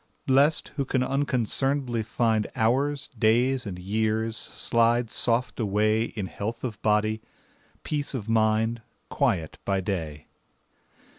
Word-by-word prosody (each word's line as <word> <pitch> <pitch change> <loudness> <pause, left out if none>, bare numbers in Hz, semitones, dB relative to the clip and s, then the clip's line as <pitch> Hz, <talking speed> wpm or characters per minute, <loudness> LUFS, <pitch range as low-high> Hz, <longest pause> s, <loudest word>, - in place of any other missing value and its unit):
Blest, 140 +4 +3
who 140 - +1
can 130 -1 0
unconcern'dly 135 -2 0
find 110 -1 0
Hours, 135 +5 +1
days, 120 +2 +2
and 90 -3 -5
years, 110 +4 -1
slide 115 0 +1
soft 120 +2 +2
away 110 +1 +2
In 105 -4 -5
health 110 +5 -5
of 115 -6 -5
body, 110 +1 +1 0.6
peace 145 -2 -2
of 110 -4 -5
mind, 110 +1 +2 0.3
Quiet 80 -4 0
by 95 -1 0
day. 80 -6 -4
115 Hz, 120 wpm, -26 LUFS, 110-125 Hz, 0.6 s, Blest